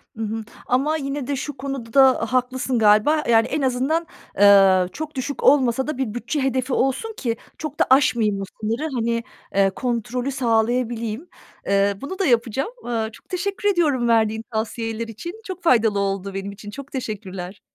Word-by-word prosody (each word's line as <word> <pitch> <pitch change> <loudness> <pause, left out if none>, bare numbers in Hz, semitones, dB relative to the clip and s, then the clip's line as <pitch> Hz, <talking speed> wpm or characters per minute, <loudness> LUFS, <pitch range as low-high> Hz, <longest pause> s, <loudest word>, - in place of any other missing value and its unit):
Hı 225 - -4
hı. 220 +1 -3 0.2
Ama 285 +5 +1
yine 275 -2 -4
de 285 - -1
şu 275 +1 -5
konuda 265 -1 +3 0.3
haklısın 255 0 0
galiba, 215 +9 +4
yani, 225 -1 +5
en 300 - -2
azından, 270 +6 0 0.3
eee, 195 -2 +7
çok 310 0 -6
düşük 270 +2 -4
olmasa 265 -2 +4
da 305 -3 -3
bir 260 -6 -2
bütçe 240 +5 -2
hedefi 260 0 0
olsun 270 - 0
ki 230 -3 -2 0.2
çok 305 -2 -6
da - - +5
aşmayayım 230 -7 +3
o - - -2 0.2
sınırı, 225 +6 -1
hani, 230 0 0 0.3
eee, 195 0 +4
kontrolü 245 +4 -2
sağlayabileyim. 235 +1 0 0.4
Eee, 200 0 +3
bunu 375 +8 -6
da 390 - +2
yapacağım. 240 - +1 0.2
Eee, 225 -2 -1
çok - - -17
teşekkür 400 +2 -1
ediyorum 295 -10 +2
verdiğin 220 -1 +2
tavsiyeler 225 +1 -3
için. 340 - -8
Çok 370 -1 -7
faydalı 225 -9 +3
oldu 195 0 -2
benim 195 +1 -4
için. 205 +1 -10
Çok 280 +5 -9
teşekkürler. 195 -6 -6
240 Hz, 165 wpm, -22 LUFS, 220-275 Hz, 0.4 s, eee